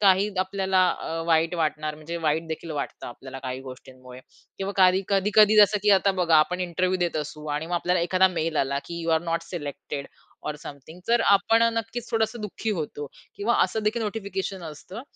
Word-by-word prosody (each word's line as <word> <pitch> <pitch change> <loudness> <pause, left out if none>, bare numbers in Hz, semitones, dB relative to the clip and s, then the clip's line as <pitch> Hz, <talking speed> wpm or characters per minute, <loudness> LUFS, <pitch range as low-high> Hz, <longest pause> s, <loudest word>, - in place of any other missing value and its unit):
काही 195 0 +4
आपल्याला 190 0 0 0.2
अ, - - -6 0.2
वाईट 165 +1 +2
वाटणार, 155 -2 -1
म्हणजे 155 +3 -6
वाईट 160 +1 +1
देखील 160 +1 -5
वाटतं 145 -2 -5
आपल्याला 130 +2 -9
काही 130 0 -5
गोष्टींमुळे. 130 -1 -12 0.4
किंवा 195 +1 -3
काही 185 0 +5
कधी-कधी 210 +2 +4
जसं, 210 0 +6
की 210 - +4
आता 195 +1 +2
बघा 175 -4 +3
आपण 180 +4 +2
इंटरव्ह्य 180 +1 0
देत 175 -2 -1
असू 150 0 -5
आणि 155 +2 -3
मग 175 - -3
आपल्याला 180 +1 +1
एखादा 185 +2 +3
मेल 165 -3 -2
आला, 140 +1 +1
की 170 0 -6
"यू 165 - -1
अरे 160 +1 +2
नोट 165 0 -1
सिलेक्टेड 145 -4 -6 0.4
ऑर 150 - -3
समथिंग." 155 +2 -11
तर 235 0 +4 0.2
आपण 225 +3 +2
नक्कीच 230 +1 -4
थोडंसं 225 0 0
दुःखी 210 +1 -4
होतो. 145 -1 -5 0.3
किंवा 220 +4 +1
असं 220 - -3
देखील 220 +2 0
नोटिफिकेशन 200 -3 -4
असतं, 185 - -10
175 Hz, 185 wpm, -25 LUFS, 155-200 Hz, 0.4 s, जसं